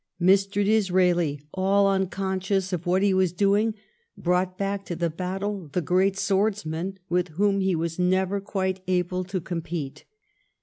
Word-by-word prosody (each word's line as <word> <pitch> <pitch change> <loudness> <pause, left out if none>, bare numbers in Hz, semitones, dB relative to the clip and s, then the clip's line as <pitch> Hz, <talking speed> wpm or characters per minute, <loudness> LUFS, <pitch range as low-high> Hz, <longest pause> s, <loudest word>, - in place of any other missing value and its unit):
Mr. 195 +2 +3
Disraeli, 180 -7 +2
all 195 +1 +3
unconscious 190 0 -1
of 175 0 -3
what 185 +2 +2
he 200 -1 +3
was 185 -2 +2
doing, 205 +4 +2 0.4
brought 180 +1 0
back 200 0 -2
to 175 - -4
the 170 0 -1
battle 190 +1 -4
the - - +1
great 185 +4 +2
swordsman 195 -3 -1
with 180 0 +1
whom 200 0 +2
he 190 -2 +1
was 165 +1 -3
never 185 +2 +1
quite 190 -2 -2
able 180 0 0
to 185 +1 -3
compete. 165 -4 -5
190 Hz, 145 wpm, -25 LUFS, 180-195 Hz, 0.4 s, Mr